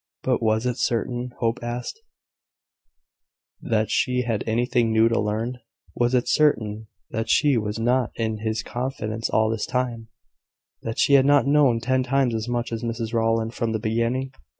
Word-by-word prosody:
But 130 Hz, -2 st, +1 dB
was 110 Hz, +1 st, +1 dB
it 125 Hz, 0 st, -1 dB
certain, 120 Hz, +1 st, -1 dB
Hope 115 Hz, -1 st, 0 dB
asked, 120 Hz, -, -5 dB, 1.6 s
that 110 Hz, -1 st, 0 dB
she 125 Hz, 0 st, +1 dB
had 115 Hz, -4 st, -1 dB
anything 120 Hz, 0 st, +1 dB
new 110 Hz, +1 st, +4 dB
to 115 Hz, 0 st, +1 dB
learn? 110 Hz, +4 st, -2 dB, 0.4 s
Was 120 Hz, +1 st, +1 dB
it 125 Hz, -, +1 dB
certain 110 Hz, -8 st, +1 dB, 0.2 s
that 110 Hz, 0 st, -3 dB
she 145 Hz, -3 st, +4 dB
was 105 Hz, -2 st, -2 dB
not 120 Hz, +1 st, +1 dB
in 110 Hz, -1 st, -2 dB
his 110 Hz, 0 st, -2 dB
confidence 115 Hz, -3 st, -3 dB
all 110 Hz, 0 st, +2 dB
this 115 Hz, -2 st, -2 dB
time 125 Hz, -3 st, -2 dB, 0.7 s
that 115 Hz, -, -5 dB
she 140 Hz, -, +3 dB
had 135 Hz, -1 st, +6 dB
not 145 Hz, -1 st, +5 dB
known 140 Hz, -5 st, +4 dB
ten 130 Hz, +3 st, +1 dB
times 130 Hz, -1 st, +1 dB
as 110 Hz, +1 st, -3 dB
much 120 Hz, 0 st, -2 dB
as 115 Hz, -1 st, -3 dB
Mrs 115 Hz, -1 st, -4 dB
Rowland 115 Hz, 0 st, +1 dB
from 115 Hz, -2 st, -2 dB
the 110 Hz, -, -1 dB
beginning? 115 Hz, +4 st, -1 dB
115 Hz, 170 wpm, -24 LUFS, 110-125 Hz, 1.6 s, had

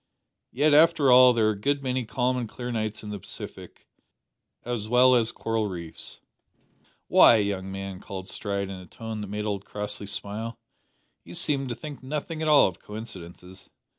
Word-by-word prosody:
"Yet, 145 Hz, +4 st, +3 dB
after 150 Hz, -3 st, +5 dB
all, 125 Hz, 0 st, +8 dB
there 115 Hz, -3 st, +2 dB
are -, -, +3 dB
a -, -, -3 dB
good 140 Hz, +7 st, -1 dB
many 130 Hz, -1 st, -1 dB
calm 125 Hz, +2 st, 0 dB
and 120 Hz, -3 st, -3 dB
clear 125 Hz, +2 st, -6 dB
nights 110 Hz, -2 st, -3 dB
in 105 Hz, -, -6 dB
the 105 Hz, -, -5 dB
Pacific, -, -, -10 dB, 0.8 s
as 115 Hz, -3 st, -3 dB
well 125 Hz, +1 st, +6 dB
as 115 Hz, -2 st, +3 dB
coral 115 Hz, -2 st, -2 dB
reefs." 85 Hz, -3 st, -7 dB, 0.9 s
"Why, -, -, +7 dB
young 100 Hz, -3 st, -1 dB
man," 95 Hz, -1 st, -6 dB
cried 95 Hz, -1 st, -7 dB
Stride 100 Hz, -1 st, -3 dB
in 95 Hz, -, -7 dB
a 90 Hz, -, -12 dB
tone 110 Hz, +3 st, -7 dB
that 105 Hz, -, -5 dB
made 105 Hz, +2 st, -4 dB
old 100 Hz, -2 st, -2 dB
Crossley 105 Hz, 0 st, -5 dB
smile, 105 Hz, +3 st, -4 dB, 0.7 s
"you -, -, -10 dB
seem 135 Hz, -2 st, +1 dB
to 120 Hz, -, -4 dB
think 150 Hz, +1 st, -9 dB
nothing 150 Hz, +4 st, -4 dB
at 160 Hz, -, -1 dB
all 150 Hz, -1 st, +7 dB
of 90 Hz, -, -7 dB
coincidences. 95 Hz, -4 st, -10 dB
110 Hz, 180 wpm, -26 LUFS, 100-130 Hz, 0.9 s, all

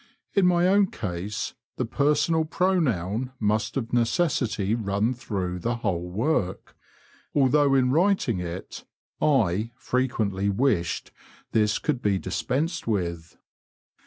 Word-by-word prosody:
'* -, -, -48 dB
In 195 Hz, -3 st, +4 dB
my 175 Hz, 0 st, +4 dB
own 200 Hz, +1 st, +4 dB
case 100 Hz, -, -4 dB, 0.2 s
the 130 Hz, -, 0 dB
personal 150 Hz, +6 st, +2 dB
pronoun 130 Hz, -, 0 dB
must 105 Hz, +4 st, 0 dB
of 115 Hz, -3 st, -4 dB
necessity 115 Hz, -, +1 dB
run 110 Hz, +1 st, 0 dB
through 95 Hz, -7 st, -3 dB
the 120 Hz, +7 st, -1 dB
whole 90 Hz, -6 st, -2 dB
worky 105 Hz, -, -1 dB, 0.6 s
although 140 Hz, 0 st, +4 dB
in 130 Hz, -1 st, +3 dB
writing 165 Hz, -, +2 dB
it 90 Hz, +1 st, -6 dB, 0.4 s
I" 110 Hz, -, +2 dB
frequently 110 Hz, -6 st, -1 dB
wished 100 Hz, -6 st, 0 dB, 0.4 s
this 105 Hz, -1 st, +2 dB
could 150 Hz, -5 st, -1 dB
he 100 Hz, -2 st, +2 dB
dispensed 160 Hz, -, -2 dB
with. 85 Hz, -6 st, -2 dB
115 Hz, 120 wpm, -26 LUFS, 100-145 Hz, 0.6 s, In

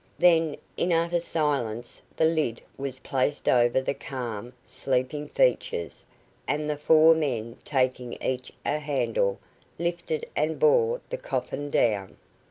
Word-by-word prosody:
Then, 165 Hz, -3 st, +4 dB, 0.2 s
in 180 Hz, -, +1 dB
utter 170 Hz, +1 st, +2 dB
silence, 135 Hz, -9 st, -1 dB
the 160 Hz, -, +3 dB
lid 155 Hz, -8 st, 0 dB
was 135 Hz, -1 st, -4 dB
placed 135 Hz, +2 st, -1 dB
over 120 Hz, +1 st, +4 dB
the 130 Hz, -, -1 dB
calm, 125 Hz, -6 st, -6 dB
sleeping 135 Hz, +3 st, -1 dB
features, 470 Hz, -2 st, 0 dB, 0.4 s
and 150 Hz, +1 st, 0 dB
the 150 Hz, -, 0 dB
four 155 Hz, +2 st, +6 dB
men, 120 Hz, -8 st, -2 dB
taking 130 Hz, -3 st, 0 dB
each 125 Hz, -1 st, -3 dB
a 150 Hz, -, +1 dB
handle, 320 Hz, -, 0 dB, 0.4 s
lifted 175 Hz, -, -2 dB
and -, -, 0 dB
bore 475 Hz, 0 st, +3 dB
the -, -, -1 dB
coffin 325 Hz, -, -3 dB
down. 105 Hz, -8 st, +1 dB
150 Hz, 130 wpm, -27 LUFS, 125-170 Hz, 0.4 s, four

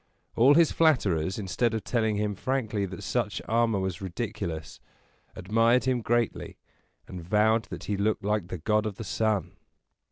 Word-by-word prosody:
All 135 Hz, +5 st, +6 dB
his 165 Hz, -1 st, +5 dB
flatterers, 95 Hz, -, +2 dB
instead 110 Hz, +3 st, -1 dB
of 110 Hz, -, -3 dB
telling 110 Hz, -2 st, 0 dB
him 105 Hz, 0 st, -1 dB
frankly 110 Hz, -3 st, -2 dB
that 95 Hz, -1 st, -8 dB
such 105 Hz, -5 st, -1 dB
armor 115 Hz, -1 st, +2 dB
was 95 Hz, -2 st, -3 dB
ridiculous, 90 Hz, -4 st, -5 dB, 0.6 s
admired 115 Hz, +6 st, +2 dB
him 125 Hz, -1 st, 0 dB
greatly, 120 Hz, 0 st, -1 dB, 0.5 s
and 90 Hz, -, -8 dB
vowed 110 Hz, +5 st, +2 dB
that -, -, -8 dB
he 105 Hz, -, -2 dB
looked 105 Hz, +1 st, 0 dB
like 105 Hz, -3 st, -1 dB
the 90 Hz, -, -5 dB
god 105 Hz, +6 st, 0 dB
of 105 Hz, -, -5 dB
the 115 Hz, -, -7 dB
sun. 110 Hz, -2 st, -1 dB
105 Hz, 160 wpm, -27 LUFS, 95-115 Hz, 0.6 s, All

